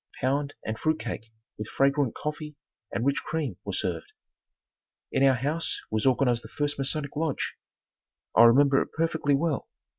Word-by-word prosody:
Pound 140 +2 0
and 110 0 -3
fruit 155 0 +1
cake 115 -1 -5 0.3
with 105 - -4
fragrant 140 -2 +2
coffee 150 0 -5 0.4
and 120 - -1
rich 140 0 +2
cream 145 - -3
were - - -4
served. - - -2 1.0
In - - +1
our 135 -1 +6
house 145 +7 -1
was 110 +4 +1
organized 125 -2 +3
the - - -9
first 145 -1 -2
Masonic 145 +1 -2
Lodge. 155 -2 -1 0.8
I 115 - +9
remember 135 +3 +6
it - - -5
perfectly 160 -3 +1
well. 155 -1 -1
140 Hz, 155 wpm, -27 LUFS, 125-150 Hz, 1.0 s, I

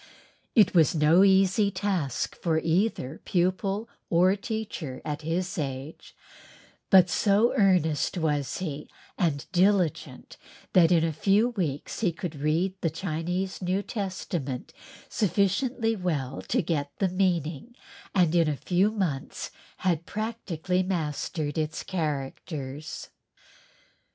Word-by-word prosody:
It 215 -4 +5
was 165 -2 +4
no 160 +4 +5
easy 195 +1 +4
task 185 - -2
for 165 -2 0
either 160 - 0
pupil 195 +4 0 0.2
or 180 +3 +4
teacher 200 - -5
at 150 0 -3
his 180 +4 -2
age, 135 +1 -6 0.7
but 185 -3 +7
so 210 +5 +3
earnest 180 - +2
was 150 -5 -1
he 150 -5 -5 0.3
and 155 -7 0
diligent 185 -3 +1 0.4
that 175 -2 +6
in 165 -2 +4
a 165 -1 0
few 200 +9 +3
weeks 165 - -3
he 195 -6 +2
could 165 -1 -6
read 160 +6 +1
the 165 - +1
Chinese 180 +3 -3
New 185 +2 0
Testament 185 - -4 0.3
sufficiently 225 - +1
well 150 -9 -2
to 245 -3 +1
get 150 -4 -1
the 195 - +2
meaning 180 - -1 0.4
and 175 -4 +4
in 165 -3 +3
a 145 - -2
few 180 - +2
months 185 -11 -3 0.3
had 170 -2 +1
practically 185 -5 -2
mastered 155 -4 -2
its 155 0 -2
"characters." 150 -2 -4
175 Hz, 120 wpm, -27 LUFS, 155-195 Hz, 0.7 s, but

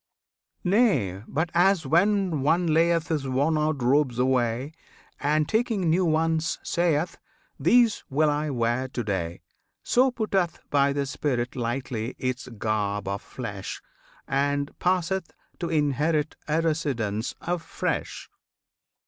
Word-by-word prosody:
Nay, 180 - +2
but 160 +4 -1
as 180 -1 +3
when 180 +1 +2
one 165 +6 +2
layeth 165 0 +2
His 150 -4 -1
worn 140 +5 +1
out 150 -3 0
robes 130 -1 +2
away, 125 +1 +1 0.5
And 150 +1 +1
taking 220 -6 +1
new 180 +2 +3
ones, 160 0 +1
sayeth, 170 -1 0 0.4
"These 235 -3 +4
will 150 +3 +2
I 150 +1 -1
wear 120 0 0
to 125 -2 -4
day!" 90 -5 -3 0.4
So 255 +2 +4
putteth 195 -8 -1
by 140 -1 +3
the 140 0 -1
spirit 125 -3 -2
Lightly 120 -1 -3
its 130 0 -3
garb 105 -3 -2
of 100 +1 -2
flesh, - - -6 0.5
And 140 +1 0
passeth 185 0 0 0.3
to 170 - -2
inherit 150 0 +1
A 155 +2 +1
residence 130 -10 -1
afresh. 170 -1 -3
150 Hz, 125 wpm, -26 LUFS, 130-170 Hz, 0.5 s, These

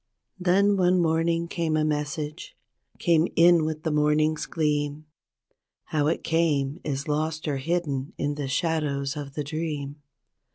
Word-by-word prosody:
Then 195 +3 +3
one 180 0 +3
morning 165 0 +1
came 165 -2 -1
a 155 - +2
message, 150 - -3 0.4
came 170 -1 +3
in 170 -1 +6
with 155 0 -4
the 160 - 0
morning's 150 +1 +2
gleam; 150 -1 -1 0.8
How 150 -2 0
it 160 - -1
came 155 -3 +1
is 140 0 -3
lost 155 +1 -1
or 145 -2 0
hidden 140 -2 -2
in 145 - -1
the 145 -1 -4
shadows 140 -1 -1
of 140 -2 -7
the 150 - -2
dream. 150 -2 -4
155 Hz, 140 wpm, -26 LUFS, 145-165 Hz, 0.8 s, in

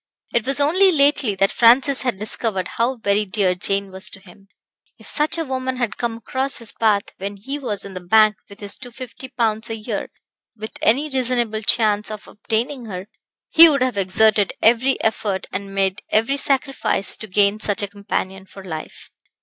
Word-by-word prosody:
It 235 +1 0
was 275 +1 +2
only 365 +7 +4
lately 280 - +2
that 195 +1 +2
Francis 255 +4 +4
had 250 -7 -1
discovered 210 -2 -2
how 240 +3 -1
very 210 -3 +1
dear 195 -2 +1
Jane 195 +2 -1
was 190 0 -5
to 200 - -11
him. 195 +1 -18 0.5
If - - -16
such 300 +3 +1
a 325 - -2
woman 260 -1 -3
had 240 -4 -2
come 235 -1 -2
across 260 +4 -2
his 230 -3 -2
path 210 -3 +1
when 200 +1 -6
he 270 +8 -5
was 215 -8 -4
in 200 - -9
the 185 - -5
bank 215 +3 +4
with 200 +1 -13
his 200 0 -6
250 255 +1 -9
pounds 220 -3 -1
a 225 - -3
year, 215 - -5 0.5
with 220 0 -7
any 275 +7 +3
reasonable 245 -5 0
chance 215 -2 +2
of 215 -1 -8
obtaining 235 +5 -3
her, 190 -1 -7 0.4
he 330 +1 +9
would 280 -4 +1
have 255 -3 -1
exerted 200 +1 +2
every 245 +4 +3
effort 205 -3 -1
and 195 +1 -6
made 195 0 0
every 225 +6 +2
sacrifice 270 -6 0
to 220 - -8
gain 200 +2 +2
such 205 -1 0
a - - -1
companion 190 -1 -5
for 195 +1 -12
life. 160 -4 -8
220 Hz, 185 wpm, -20 LUFS, 200-255 Hz, 0.5 s, he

